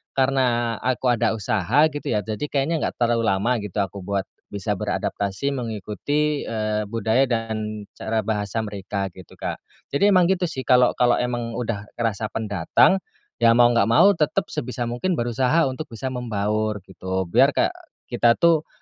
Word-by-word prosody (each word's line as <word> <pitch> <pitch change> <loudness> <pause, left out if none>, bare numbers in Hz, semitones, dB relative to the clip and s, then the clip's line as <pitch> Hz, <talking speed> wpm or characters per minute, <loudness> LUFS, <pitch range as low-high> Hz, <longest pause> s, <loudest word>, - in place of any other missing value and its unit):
karena 125 -3 +1
aku 130 +1 0
ada 120 - +2
usaha 110 - +2
gitu 145 0 -6
ya 105 - +2
jadi 110 +1 -5
kayaknya 145 +4 +1
nggak - - -2
terlalu 120 -1 +2
lama 105 +6 +1
gitu 105 -4 -8
aku 100 +1 -7
buat 100 +1 -1 0.3
bisa 100 0 -2
beradaptasi 100 +8 -2
mengikuti, 130 +6 -2
eee, 110 -1 -2
budaya 115 +4 +1
dan 110 -4 -3
cara 110 0 -2
bahasa 105 0 -2
mereka 100 -2 -3
gitu 95 -2 -14
Kak, - - -3 0.3
jadi 200 +9 +2
emang 180 -3 +5
gitu 185 0 +1
sih 145 -7 -3
kalau 125 -1 +5
kalau 120 -1 +4
emang 120 -1 -2
udah 110 -4 -3
ngerasa 110 -2 -1
pendatang, 105 - +2 0.4
ya 115 -1 +5
mau 120 0 +6
nggak 115 -4 +3
mau 115 - +6
tetap 160 -6 -1
sebisa 125 0 -3
mungkin 120 +10 -1
berusaha 125 +6 +1
untuk 140 +4 -6
bisa 130 +1 -5
membaur 110 -4 -2
gitu 95 -1 -4
biar - - +4
kayak - - +2 0.4
kita 115 0 +4
tuh, 165 -2 +3
115 Hz, 165 wpm, -23 LUFS, 105-130 Hz, 0.4 s, mau